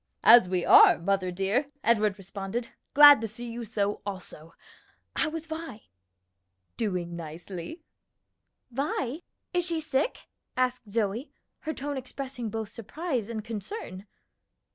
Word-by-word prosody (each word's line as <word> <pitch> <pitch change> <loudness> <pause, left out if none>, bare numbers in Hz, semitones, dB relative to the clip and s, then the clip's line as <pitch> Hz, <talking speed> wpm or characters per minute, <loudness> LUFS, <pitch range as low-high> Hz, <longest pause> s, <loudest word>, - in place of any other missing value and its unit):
"As 230 -5 +8
we 180 -1 0
are, - - +8
mother 190 +1 0
dear," 195 +10 0 0.2
Edward 215 -3 +2
responded. 195 +4 -5 0.3
"Glad 290 -3 +10
to 225 - -2
see 235 +3 -8
you 235 +1 -6
so, 205 -2 -2
also. 180 -5 -8 0.6
How 320 - +1
is 325 0 -5
Vi?" 315 -8 -8 0.9
"Doing 180 -6 -2
nicely." 170 - -8 0.9
"Vi! 275 +2 -2 0.3
Is 355 0 +2
she 335 -2 0
sick?" 305 - -1 0.3
asked 250 -3 0
Zoe, 220 +5 -1 0.3
her 315 - -4
tone 285 0 -4
expressing 260 -2 -6
both 220 -1 -4
surprise 250 - -4
and 220 -2 -5
concern. 215 - -7
230 Hz, 125 wpm, -28 LUFS, 195-275 Hz, 0.9 s, Glad